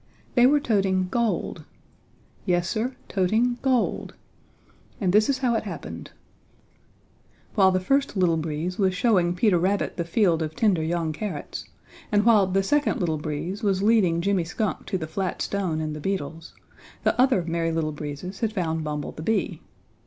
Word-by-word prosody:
They 245 Hz, 0 st, +6 dB
were 295 Hz, +2 st, +4 dB
toting 195 Hz, -7 st, +1 dB
gold! 235 Hz, -1 st, -1 dB, 0.8 s
Yes, 175 Hz, -1 st, +2 dB
Sir, 235 Hz, +6 st, -2 dB
toting 225 Hz, +6 st, +1 dB
gold! 260 Hz, -3 st, 0 dB, 0.8 s
And 185 Hz, -3 st, +1 dB
this 215 Hz, +3 st, +4 dB
is 275 Hz, -, +2 dB
how 255 Hz, -3 st, +1 dB
it 225 Hz, -, +1 dB
happened: -, -, -7 dB, 1.4 s
While 195 Hz, -3 st, +5 dB
the 185 Hz, -, +1 dB
first 275 Hz, +4 st, 0 dB
Little 180 Hz, -3 st, +3 dB
Breeze 160 Hz, +4 st, -3 dB
was 190 Hz, -2 st, +2 dB
showing 180 Hz, -5 st, +2 dB
Peter 180 Hz, -1 st, +3 dB
Rabbit 195 Hz, +4 st, 0 dB
the 170 Hz, -, 0 dB
field 170 Hz, -1 st, +2 dB
of 155 Hz, 0 st, -3 dB
tender 200 Hz, -7 st, +2 dB
young 165 Hz, 0 st, -1 dB
carrots, 170 Hz, -3 st, -5 dB, 0.5 s
and 205 Hz, 0 st, +3 dB
while 215 Hz, -5 st, +5 dB
the 195 Hz, +1 st, +1 dB
second 290 Hz, +8 st, +1 dB
Little 160 Hz, -4 st, 0 dB
Breeze 160 Hz, +6 st, -4 dB
was 195 Hz, -2 st, +1 dB
leading 200 Hz, -7 st, +3 dB
Jimmy 195 Hz, -1 st, +1 dB
Skunk 205 Hz, +6 st, -3 dB
to 190 Hz, -, -1 dB
the 160 Hz, -, -4 dB
flat 185 Hz, +4 st, -3 dB
stone 185 Hz, -6 st, -1 dB
and 155 Hz, -1 st, -3 dB
the 150 Hz, -, -7 dB
beetles, 165 Hz, -3 st, -4 dB, 0.5 s
the -, -, +3 dB
other 255 Hz, -9 st, +3 dB
Merry 165 Hz, 0 st, -1 dB
Little 160 Hz, -1 st, -1 dB
Breezes 150 Hz, +6 st, -6 dB
had 225 Hz, -2 st, 0 dB
found 160 Hz, -5 st, -1 dB
Bumble 150 Hz, -1 st, -3 dB
the -, -, -9 dB
Bee. 190 Hz, -3 st, -1 dB
185 Hz, 165 wpm, -25 LUFS, 165-215 Hz, 1.4 s, They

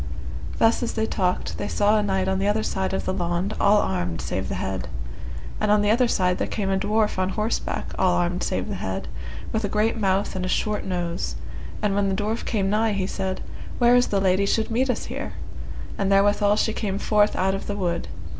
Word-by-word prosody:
Thus 225 Hz, 0 st, +4 dB
as 240 Hz, -, -1 dB
they 220 Hz, -1 st, 0 dB
talked 185 Hz, -4 st, -1 dB
they 205 Hz, -, -2 dB
saw 210 Hz, +1 st, +3 dB
a 215 Hz, -, +3 dB
knight 190 Hz, -2 st, 0 dB
on 190 Hz, 0 st, +1 dB
the 195 Hz, -, +1 dB
other 215 Hz, +1 st, +2 dB
side 190 Hz, -2 st, -1 dB
of 190 Hz, -, -2 dB
the -, -, 0 dB
laund 175 Hz, +3 st, -1 dB
all 205 Hz, +1 st, +6 dB
armed 90 Hz, -, 0 dB
save -, -, -3 dB
the -, -, -2 dB
head. -, -, -3 dB, 0.7 s
And 210 Hz, -, +1 dB
on 210 Hz, 0 st, +5 dB
the 205 Hz, -, +3 dB
other 240 Hz, +2 st, +4 dB
side 180 Hz, -5 st, +1 dB
there -, -, 0 dB
came 195 Hz, -3 st, -1 dB
a 190 Hz, -, +2 dB
dwarf 210 Hz, 0 st, +1 dB
on 185 Hz, 0 st, +1 dB
horseback 215 Hz, +3 st, -2 dB
all 180 Hz, -1 st, +4 dB
armed 175 Hz, +1 st, 0 dB
save -, -, -1 dB
the -, -, -3 dB
head, -, -, -3 dB, 0.4 s
with 220 Hz, -1 st, -1 dB
a 205 Hz, -, 0 dB
great 215 Hz, +3 st, +1 dB
mouth 195 Hz, -1 st, +1 dB
and 185 Hz, -, -2 dB
a 185 Hz, -, -1 dB
short 210 Hz, +2 st, 0 dB
nose; 175 Hz, -2 st, -2 dB, 0.5 s
and 205 Hz, -2 st, +2 dB
when 200 Hz, 0 st, +2 dB
the 190 Hz, -, 0 dB
dwarf 215 Hz, +3 st, -2 dB
came 200 Hz, -4 st, 0 dB
nigh 215 Hz, +2 st, +2 dB
he 195 Hz, -2 st, 0 dB
said, 190 Hz, 0 st, -3 dB, 0.4 s
Where 240 Hz, 0 st, +5 dB
is 245 Hz, 0 st, +4 dB
the 200 Hz, -, +1 dB
lady 195 Hz, +1 st, +3 dB
should 220 Hz, +2 st, +1 dB
meet 255 Hz, +4 st, +1 dB
us 250 Hz, -, -1 dB
here? -, -, -5 dB, 0.7 s
and 200 Hz, 0 st, +1 dB
therewithal 205 Hz, +1 st, +4 dB
she 220 Hz, +1 st, +1 dB
came 200 Hz, -3 st, -2 dB
forth 210 Hz, 0 st, +3 dB
out 190 Hz, +1 st, +2 dB
of 195 Hz, -, -4 dB
the 205 Hz, -, -2 dB
wood. 175 Hz, -4 st, -1 dB
200 Hz, 225 wpm, -24 LUFS, 190-215 Hz, 0.7 s, all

